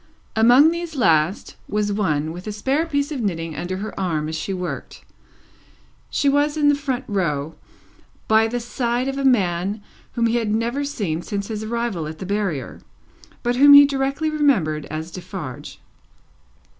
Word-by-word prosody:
Among 245 +8 +6
these 340 -1 -5
last, 165 - +1
was 210 -1 0
one, 155 -7 0
with 180 +4 -9
a - - -2
spare 270 +10 -1
piece 285 -1 -1
of 275 -5 -3
knitting 165 -6 -3
under 180 +5 -4
her 210 +1 -6
arm 160 -5 -1
as 160 - -4
she 165 +5 -4
worked. 180 -2 -6 1.0
She 285 - 0
was 290 +2 +2
in 290 -1 +4
a - - +2
front 275 -3 -3
row, 160 -7 -1 0.7
by 220 +1 +4
the 245 +2 -2
side 240 +1 -2
of 270 0 -3
a - - -2
man 200 -4 +1 0.3
whom 235 - +1
he 230 +1 +2
had 225 -3 -1
never 235 +6 -1
seen 200 - -3
since 200 +2 -4
his 215 -1 -4
arrival 230 -8 -2
at 155 +1 -7
the 190 - -7
Barrier, 190 - -3 0.6
but 245 +1 0
whom 285 +2 +8
he 285 0 +10
directly 275 +3 -1
remembered 190 - +1
as 155 +2 -6
Defarge. 160 -6 -8
215 Hz, 170 wpm, -22 LUFS, 175-270 Hz, 1.0 s, he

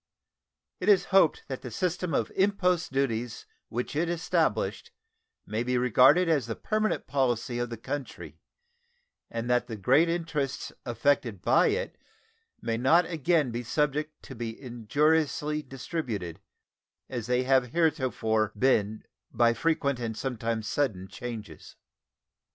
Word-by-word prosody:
It 180 - 0
is 200 -3 +5
hoped 190 -5 +4
that 130 -2 -5
the 125 - -7
system 180 +7 -2
of - - 0
impost 180 -5 +1
duties 120 -4 -2 0.2
which 125 +5 -4
it 165 +3 +1
established 175 0 0 0.6
may 110 +2 -2
be 125 +1 0
regarded 130 +8 +5
as 145 -8 +1
the 115 - -3
permanent 215 0 -1
policy 120 -3 0
of 120 -1 -2
the 115 - -6
country, 135 +4 -6 0.9
and 115 +1 -4
that 125 0 +2
the 115 - -5
great 135 - +3
interests 160 -5 -2 0.2
affected 120 -3 +1
by 95 - +4
it 475 +3 -2 0.6
may 115 -1 -1
not 160 +9 +4
again 160 -4 +1
be 120 +1 -3
subject 150 +4 -1
to - - -9
be 115 -2 -6
injuriously 150 +5 0
disturbed, 125 - -5 0.7
as 120 -4 -5
they 125 +1 +2
have 130 -1 +3
heretofore 125 - +1
been 110 -3 +2 0.3
by 120 -1 +3
frequent 140 0 0
and 115 -2 -4
sometimes 115 -4 -2
sudden 100 -11 -1
changes. 115 -4 -8
130 Hz, 135 wpm, -28 LUFS, 115-155 Hz, 0.9 s, is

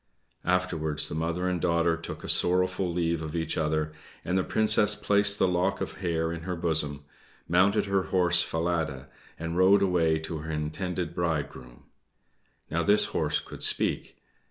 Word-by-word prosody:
Afterwards 80 -5 0
the - - -6
mother 85 +3 -2
and 90 -2 -1
daughter 85 -1 +2
took 85 - -8
a - - -6
sorrowful 90 0 +1
leave 85 -1 -1
of 80 0 -6
each 80 -1 -2
other, 75 0 -1 0.3
and 90 - -1
the 95 - +2
princess 105 0 +3
placed 100 0 +2
the - - +2
lock 90 +2 0
of - - -6
hair 85 -3 -1
in 85 - -6
her 90 +2 -4
bosom, 75 -4 -1 0.4
mounted 95 +5 +3
her 100 -1 0
horse 90 -1 +6
Falada, 80 -6 -2 0.3
and 85 +1 -4
rode 95 +2 +5
away 85 -4 +2
to 80 0 -6
her 75 +2 -8
intended 85 +3 -3
bridegroom. 75 -8 -4 0.9
Now 85 +2 0
this 100 +6 +4
horse - - 0
could - - -11
speak. - - -1
85 Hz, 160 wpm, -27 LUFS, 80-90 Hz, 0.9 s, horse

